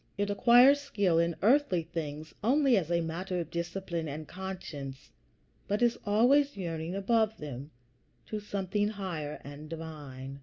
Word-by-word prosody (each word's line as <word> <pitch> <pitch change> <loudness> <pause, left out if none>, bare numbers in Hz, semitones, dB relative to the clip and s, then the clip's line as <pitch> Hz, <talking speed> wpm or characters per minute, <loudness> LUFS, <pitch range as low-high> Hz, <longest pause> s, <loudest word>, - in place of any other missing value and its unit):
It 205 0 0
acquires 245 +6 +6
skill 200 -12 +1
in 170 0 +1
earthly 230 - +4
things 155 -1 -6
only 270 +2 +4
as 175 -6 0
a 170 0 +2
matter 180 +3 -3
of 170 -1 -5
discipline 170 -1 -3
and 150 +1 -6
conscience, 180 -8 -7 0.6
but 205 +4 +1
is 240 -1 +4
always 255 +6 +4
yearning 165 -1 -4
above 220 +2 +1
them 140 -1 -7 0.6
to 215 - -4
something 205 0 -1
higher 180 -8 -4
and 145 +2 -9
divine. 145 -5 -7
180 Hz, 145 wpm, -30 LUFS, 160-210 Hz, 0.6 s, acquires